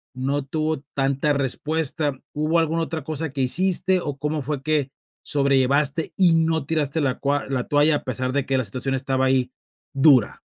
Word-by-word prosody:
no 135 +2 -2
tuvo 155 +2 -2 0.2
tanta 140 +2 +1
respuesta, 145 +1 -1
¿hubo 155 +3 0
alguna 165 +1 0
otra 160 -3 -5
cosa 155 -1 -3
que 135 - -2
hiciste 185 +6 +2
o 145 -3 -5
cómo 150 +1 -2
fue 140 0 -4
que 150 -3 0 0.3
sobrellevaste 140 +2 +1
y 180 -3 +4
no 160 -2 +1
tiraste 155 0 -1
la 130 -3 -1
cua 145 0 -1
la 130 -2 -2
toalla 145 +1 +3
a - - -11
pesar 130 0 -2
de 140 -2 0
que 135 -1 0
la 130 - 0
situación 130 +5 -2
estaba 130 0 0
ahí, 130 -1 +1 0.4
dura? 135 -5 +4
145 Hz, 175 wpm, -22 LUFS, 135-155 Hz, 0.4 s, y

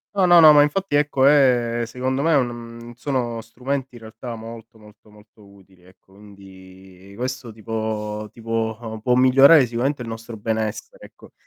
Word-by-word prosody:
No, 195 -2 +3
no, 175 -1 +6
no, 155 -1 +9
ma 145 - +6
infatti 150 +2 -2
ecco 145 -2 +1
è 125 -5 +3
secondo 130 +3 -3
me 165 +1 +2
un 120 -3 -3
sono 120 -3 -3
strumenti 130 +3 -5
in - - -11
realtà 110 +2 -9
molto, 115 0 -12
molto, 105 0 -20
molto 105 0 -21
utili 95 -2 -22
ecco 95 +1 -24
quindi 95 -1 -16
questo 125 +1 -5
tipo 110 -1 -5
tipo 115 -1 -5
può 125 - +1
migliorare 135 +3 +6
sicuramente 125 +4 -2
il 120 - -7
nostro 115 0 -8
benessere 110 - -5
ecco. - - -18
115 Hz, 155 wpm, -21 LUFS, 110-130 Hz, -, no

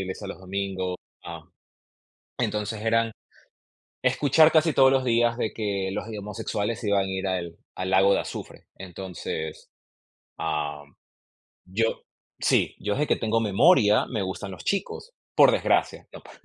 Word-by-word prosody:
iglesia 95 +2 -5
los 100 - -7
domingos, 95 -1 -3 0.3
ah 85 -2 -8 0.9
entonces, 105 0 -2
eran 115 0 +2 0.9
escuchar 155 +3 +4
casi 160 0 +4
todos 135 -1 +5
los 130 -1 +2
días 120 -1 +2
de 110 -4 -2
que: 100 -3 -2
"Los, 105 - -4
eh, 110 -2 -6
homosexuales 105 +2 -3
se 110 - -3
iban 100 -1 +3
a - - -5
ir 95 +1 -3
al 85 -3 -3 0.2
al 95 0 -3
lago 95 +1 +5
de - - +1
azufre". - - -8
Entonces, 90 -4 -6 0.7
am, 75 -3 -3 0.7
yo 115 +5 -1 0.4
sí. - - +2
Yo 105 - -1
desde 150 +6 0
que - - +3
tengo 115 0 0
memoria, 110 - +4
me 110 -5 -2
gustan 95 +1 -5
los 90 - -10
chicos, 310 - -3 0.2
por - - +7
desgracia, - - 0
¿no? - - -11
pa - - -15
100 Hz, 155 wpm, -25 LUFS, 95-115 Hz, 0.9 s, por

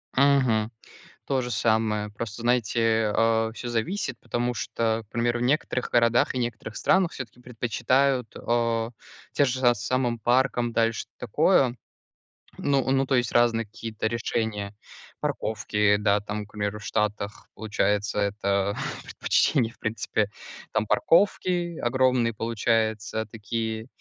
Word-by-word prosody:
Мгм. 130 -5 +3 0.6
То 135 -1 +1
же 125 0 -4
самое. 110 -1 +1
Просто, 110 +1 -6
знаете, 115 -2 +2
а, 115 0 +2
всё 120 +1 -6
зависит, 125 - -2
потому 120 0 -2
что, 115 0 -1
к - - -50
примеру, 120 +1 0
в - - -1
некоторых 130 -1 0
городах 120 +1 +3
и - - -1
некоторых 115 -2 -4
странах 190 -3 +2
всё-таки 125 -1 -8
предпочитают, 125 +1 0
а, 115 -1 0 0.4
те 145 - +3
же, 130 0 -1
а, 120 - +6
самым 120 +1 -1
паркам, 120 0 +1
дальше 115 -1 0
такое 130 - +2 0.8
Ну 140 -2 +1
ну, 135 0 +3
то 135 - +1
есть 120 -2 0
разные 115 -1 +3
какие-то 110 0 -4
решения. 110 -3 -2 0.5
Парковки, 105 -1 +1
да, 105 -1 +2
там 105 0 -5
к 105 - -23
примеру, 105 0 -3
в - - -11
Штатах, 105 0 -2
получается, 105 -1 -1
это 100 -1 0 0.3
предпочтение, 120 -7 +1
в - - -28
принципе. 110 -1 -1 0.4
Там 110 -1 0
парковки 175 -2 +2
огромные, 125 -1 +2
получается, 110 -1 0
такие, 110 +1 -4
115 Hz, 130 wpm, -26 LUFS, 110-125 Hz, 0.8 s, а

